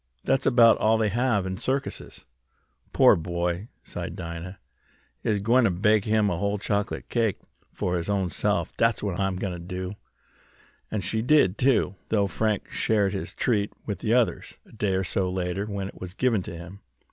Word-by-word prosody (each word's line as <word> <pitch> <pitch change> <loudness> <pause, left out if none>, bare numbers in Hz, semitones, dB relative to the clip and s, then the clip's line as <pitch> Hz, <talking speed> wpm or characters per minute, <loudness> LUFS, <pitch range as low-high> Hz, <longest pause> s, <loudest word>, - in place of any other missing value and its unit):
"That's 135 0 +1
about 120 -3 +6
all 110 +1 +3
they 110 -1 +1
have 115 -2 +1
in 95 0 -3
circuses." 135 +5 -3 0.7
"Pore - - +6
boy!" 85 +3 -2 0.2
sighed - - -6
Dinah. 85 +3 -6 0.7
"I'se 105 -2 +1
gwine 120 +4 +4
t' - - +4
bake 105 +3 +2
him 110 -1 +2
a 90 -4 -1
whole 100 +1 0
chocolate 100 0 -2
cake 115 -5 0 0.3
fo' 90 - -2
his 85 +1 -2
ownse'f; 95 -3 0
dat's 115 -2 +2
what 100 -3 -2
I 95 - +2
am!" 95 -1 -3 1.5
And 105 -3 -2
she 110 +5 0
did, 120 -7 +3
too, 125 -7 +3 0.2
though 105 -2 +2
Frank 105 +1 -1
shared 105 -3 +1
his 95 - -5
treat 105 -4 +1
with 105 - -4
the 115 +1 +1
others, 125 -2 0
a - - -20
day 105 -3 -1
or 95 - +1
so 95 0 0
later, 90 +2 -2
when 100 -2 -3
it - - -15
was 90 0 -7
given 120 -6 +2
to 85 - -7
him. 90 +4 -10
100 Hz, 175 wpm, -26 LUFS, 95-110 Hz, 1.5 s, about